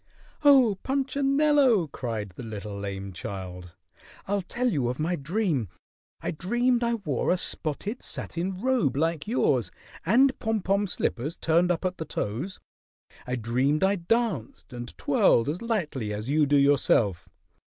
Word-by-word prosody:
"Oh, 260 -9 +6
Punchinello!" 275 - +2
cried 115 -7 -4
the - - -8
little 105 -3 -6
lame 100 -1 -5
child. 90 -2 -7 0.5
"I'll 200 0 0
tell 245 +7 -2
you 145 - +1
of 125 - -3
my 170 +4 0
dream. 155 - -1 0.5
I - - -2
dreamed 240 +9 +1
I 235 0 +1
wore 155 - -2
a 185 - +3
spotted 180 - -3
satin 180 +2 -4
robe 240 - +1
like 160 +1 0
yours 130 - +1 0.3
and 260 - +4
pom 225 -2 -1
pom 200 +1 +1
slippers 150 -3 -2
turned 170 +2 +2
up 175 +1 0
at 185 0 -1
the 160 - -3
toes. 140 - -4 0.7
I 125 - -1
dreamed 125 - +1
I 195 +1 +4
danced 185 - -2
and 120 -1 -8
twirled 120 -4 +3
as 155 +5 -2
lightly 155 - -2
as 105 +6 -4
you 150 -1 +3
do 145 +1 +4
yourself. 120 - +2
165 Hz, 150 wpm, -27 LUFS, -, 0.7 s, Oh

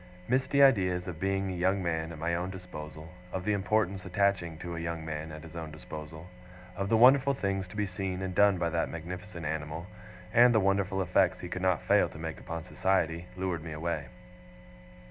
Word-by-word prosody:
Misty 135 +2 +3
ideas 90 -9 +4
of 85 -4 -6
being 95 0 0
a - - -4
young 95 +2 +1
man 80 -1 -1
at 80 - -8
my 85 +3 -1
own 90 +2 -1
disposal, 80 -4 -8 0.2
of 95 -1 -4
the 105 - +2
importance 100 -1 +1
attaching 90 -3 0
to 85 +1 -6
a - - -4
young 85 -1 -4
man 80 0 -4
at 75 0 -9
his 80 0 -11
own 80 -2 -5
disposal, 80 +1 -8 0.5
of 100 0 -2
the 115 - +4
wonderful 135 +3 +6
things 95 -5 -1
to 90 - -12
be 105 -1 0
seen 95 0 -3
and 95 -1 -3
done 100 0 +5
by 85 -1 0
that 85 0 0
magnificent 85 +1 -7
animal, 80 +2 -3 0.5
and 120 0 +7
the - - +6
wonderful 95 -1 +1
effects 90 +1 +2
he 90 - -5
could 90 - -4
not 95 -3 +2
fail - - +4
to - - -11
make 80 0 -5
upon 85 -2 -5
society, 85 -2 0
lured 90 -4 -2
me 80 -2 -6
away. 75 -2 -3
90 Hz, 205 wpm, -30 LUFS, 80-95 Hz, 0.5 s, and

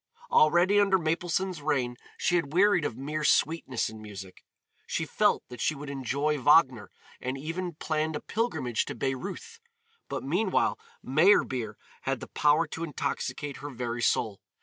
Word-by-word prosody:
Already, 175 +6 +5
under 195 -2 +4
Mapleson's 175 +1 -1
reign, 130 -5 0 0.2
she 175 - +1
had 155 -4 0
wearied 190 -3 +4
of 120 - -3
mere 150 +3 -3
sweetness 155 -2 +2
in 110 0 -9
music; 95 -3 -10 0.4
she - - -1
felt - - +2
that 125 -2 -8
she 155 - +1
would 140 0 -7
enjoy 140 +3 -1
Wagner 130 - +4 0.3
and 130 +2 -3
even 165 +4 -4
planned 155 0 -1
a - - -2
pilgrimage 205 - -1
to - - -6
Bayreuth, 190 - -4 0.5
but - - -4
meanwhile 185 +8 +1 0.2
Meyerbeer 130 - +3 0.3
had - - -2
the - - -9
power 150 +3 +3
to 160 +1 -6
intoxicate 145 -2 -3
her 145 - -7
very 120 -2 -4
soul. 110 -3 +1
150 Hz, 150 wpm, -28 LUFS, 130-170 Hz, 0.5 s, Already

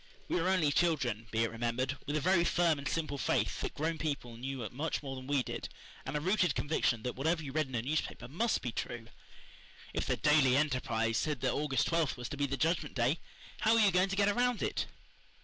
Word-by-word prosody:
We 180 - 0
were 180 - +1
only 175 -6 +3
children, 135 -10 +1
be 115 +1 +1
it 115 - -1
remembered, 120 +3 -1
with 145 - -1
a - - +2
very 180 +1 +4
firm 170 -3 +2
and 140 - -4
simple 155 -4 -2
faith - - 0
that - - -3
grown 160 +1 -1
people 140 -6 -3
knew 130 -1 -4
much 150 +4 -2
more 135 -1 -5
than 130 0 -8
we 140 -2 +2
did, - - -5 0.4
and 135 +3 -1
a - - 0
rooted 180 -2 +2
conviction 125 -7 +1
that 125 - -3
whatever 160 +4 0
you 140 - -5
read 155 0 0
in 130 - -6
a 115 - -1
newspaper 150 0 -2
must 215 - 0
be 120 - -2
true. 115 0 -5 0.8
If - - -2
the - - +1
Daily 150 -4 +4
Enterprise 125 -6 +1
said 150 -5 -1
that 130 - +1
August 145 -2 +1
twelfth 165 -6 +1
was 125 -1 -5
to 145 - -5
be 140 0 +1
the 140 +1 -2
Judgment 160 -1 0
Day 130 +6 +2 0.4
how 220 +1 +4
were - - +4
you 205 -2 +5
going 185 +2 +3
to 195 - -1
get 200 0 +3
around 245 +3 +1
it? - - -1
145 Hz, 230 wpm, -32 LUFS, 130-165 Hz, 0.8 s, you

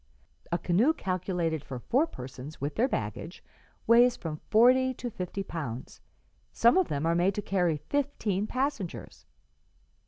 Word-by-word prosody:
A 170 - +2
canoe 205 - +2
calculated 180 - -2
for 130 - -6
four 265 - +1
persons, 130 - -9
with 145 +2 -3
their 240 - +2
baggage, 120 - -4 0.4
weighs 240 +2 +5
from 155 -3 -6
forty 255 +3 +5
to 245 0 -5
fifty 185 +1 -4
pounds; 140 -10 -6 0.5
some 235 +1 +4
of 375 -2 +3
them 145 +2 -2
are 165 - +2
made 180 +3 +2
to 210 - -2
carry 180 -6 +1
fifteen 220 -8 -1
passengers.' 255 - -4
185 Hz, 145 wpm, -29 LUFS, 160-245 Hz, 0.5 s, weighs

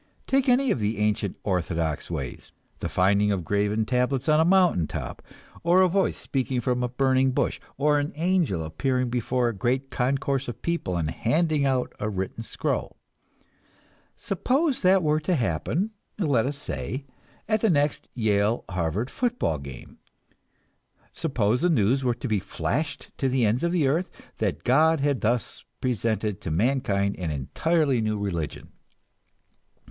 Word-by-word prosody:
Take 270 0 +2
any 250 0 +4
of - - 0
the 105 0 -1
ancient 105 -2 0
orthodox 85 -5 -1
ways, 70 -8 -5 0.3
the - - -3
finding 100 +2 +3
of 95 -3 -1
graven 105 +4 0
tablets 125 +3 0
on 155 0 +5
a - - +5
mountain 175 - +4
top, - - -6 0.4
or 175 +3 +5
a - - +5
voice 195 +2 +1
speaking 130 -1 -2
from 125 +1 0
a 125 - 0
burning 130 +1 +2
bush, - - 0 0.2
or 145 +1 +3
an 145 +1 -2
angel 165 - +1
appearing 125 +11 -1
before 125 +1 0
a - - -3
great 130 +6 -1
concourse 135 +2 0
of 120 - -7
people 170 - -1
and 80 -2 -1
handing 155 +2 +1
out 130 -2 0
a 105 - -1
written 95 +2 -4
scroll. 115 - -3 1.2
Suppose 265 - 0
that 185 -1 +4
were 155 0 +2
to 165 +4 0
happen, 145 - -1 0.3
let 140 - +2
us 140 0 -3
say, 140 -1 -5 0.4
at 215 -1 +1
the 225 - +3
next 145 -3 +1
Yale 110 -1 +1
Harvard 90 +7 -1
football 245 - -1
game; 70 -3 -10 1.1
suppose 125 -6 0
the 180 - +3
news 130 - +2
were 120 -2 +1
to 125 - -5
be 110 -3 +1
flashed 145 - -3
to 135 - +1
the 130 -2 +2
ends 110 +7 +1
of 170 - +1
the 165 -6 +2
earth 165 +7 +1 0.3
that 95 -8 -1
God 155 +5 +4
had 140 -3 +1
thus 120 +1 -1 0.2
presented 110 -4 -1
to - - -4
mankind 100 - +1
an 90 -3 -2
entirely 135 - +1
new 110 -1 0
religion. 90 -7 -4
125 Hz, 160 wpm, -26 LUFS, 105-155 Hz, 1.2 s, on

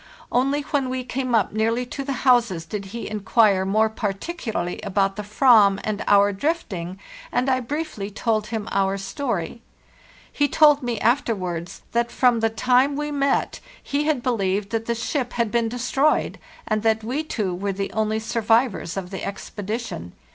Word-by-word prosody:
Only 275 +4 +2
when 280 -3 -1
we 255 0 -2
came 255 -1 -1
up 210 -3 +1
nearly 225 +3 0
to 275 +3 -5
the 275 0 -2
houses 230 -10 +3
did 200 +4 -5
he 230 +5 -6
inquire 210 -2 +2
more 215 +3 +3
particularly 220 - -3
about 195 -1 0
the 210 - -4
Ayam 210 -2 +5
and 215 -1 -2
our 205 0 +5
drifting, 195 - -3 0.3
and 250 +2 0
I 260 -1 +2
briefly 260 -5 -4
told 215 0 -1
him 220 -2 -4
our 195 0 +1
story. 200 0 -3 0.7
He 290 - +2
told 295 0 +5
me 240 -4 -2
afterwards 185 -9 -1
that 235 0 0
from 245 -2 +3
the 225 0 +2
time 250 +5 +2
we 295 +1 -3
met 280 -1 0 0.2
he 290 +1 -1
had 295 -6 0
believed 200 -4 0
that 225 0 -2
the 235 - 0
ship 245 +2 -2
had 235 -3 0
been 235 0 +1
destroyed, 255 +5 +1 0.3
and 215 -1 0
that 220 0 +1
we 260 +7 -2
two 210 - -2
were 200 +3 -2
the 195 +1 -4
only 220 0 0
survivors 225 -4 +1
of 180 -2 -5
the 190 - -4
expedi 205 +2 -4
tion. 90 - -7
225 Hz, 170 wpm, -23 LUFS, 200-255 Hz, 0.7 s, Ayam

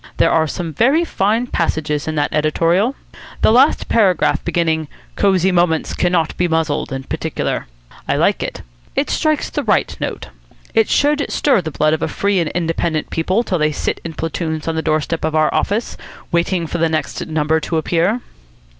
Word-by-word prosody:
There - - +3
are 160 -1 +3
some 165 +1 -4
very 275 - +3
fine 220 -2 +1
passages 155 -8 -1
in 155 - -2
that 145 -1 0
editorial. 165 - +2 0.5
The - - +6
last 260 +6 +4
paragraph, 195 -7 +2
beginning 160 -2 0 0.3
'Cosy 190 -2 +3
Moments 175 -3 +1
cannot 175 -3 +1
be 175 - +2
muzzled,' 160 -5 -1
in 135 0 -4
particular. - - -3 0.4
I - - +1
like - - +2
it. - - -5 0.3
It - - 0
strikes 310 -2 0
the 295 - -1
right 215 -7 +1
note. - - -4 0.4
It 225 -1 +3
should 290 0 +2
stir 265 -9 +2
the 160 - -4
blood 155 +1 +1
of 160 - -1
a - - 0
free 200 -1 0
and 165 -3 0
independent 165 -2 -1
people 185 +8 +1
till 185 -6 -1
they 155 0 +2
sit - - -3
in 165 - -6
platoons 160 -1 -3
on 165 - 0
the 160 - -1
doorstep 155 +1 -1
of 160 0 -1
our 155 -1 +3
office, 215 +4 -1 0.3
waiting 170 0 +1
for 170 +2 -4
the 165 0 +2
next 155 -3 -3
number 160 0 +1
to 160 +1 -2
appear." 170 +9 +1
165 Hz, 180 wpm, -18 LUFS, 160-200 Hz, 0.5 s, The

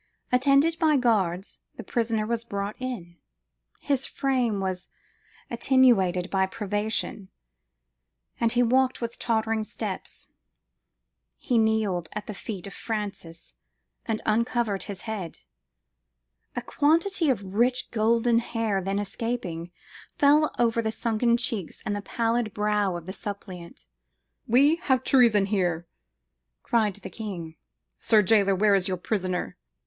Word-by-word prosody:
Attended 275 +6 +3
by 310 -3 +4
guards, 195 -7 0 0.2
the - - -8
prisoner 225 -3 -1
was 230 +1 -2
brought 200 -2 -4
in: 220 -10 -6 0.6
his 275 -2 -1
frame 250 -6 0
was 185 -2 -3 0.6
attenuated 235 -8 +3
by 190 -1 +2
privation, 205 -1 -2 1.1
and 230 -1 +2
he 245 0 +3
walked 260 +2 +2
with 235 -1 -5
tottering 220 -1 0
steps. - - -6 1.1
He 245 -3 +1
knelt 215 -6 +1
at 210 -1 -5
the 215 - -6
feet 195 -2 -6
of 200 - -7
Francis, 200 -7 -5 0.5
and 220 -2 -2
uncovered 225 -2 0
his 200 -2 -6
head; 200 -7 -5 1.1
a - - -3
quantity 330 +3 +2
of 195 -7 -2
rich 245 +4 +1
golden 230 +1 +3
hair 225 -4 -1
then 195 +2 -2
escaping, 200 -5 -3 0.5
fell 300 +1 +5
over 230 -1 +2
the 220 -1 -1
sunken 235 +1 +1
cheeks 225 -7 -2
and 205 -1 -2
pallid 230 0 -1
brow 210 -3 +1
of 170 -1 -7
the 190 - -6
suppliant. 190 -4 -8 0.6
"We 280 +7 +5
have 260 -7 +1
treason 235 -8 +5
here!" 175 -4 0 0.8
cried 215 -4 +1
the 205 - -9
king: 175 -8 -6 0.4
"sir 215 -2 +4
jailor, 200 -1 +4
where 205 +2 +3
is 190 -2 +2
your 185 -1 -1
prisoner?"" 185 -1 -2
220 Hz, 125 wpm, -26 LUFS, 195-240 Hz, 1.1 s, fell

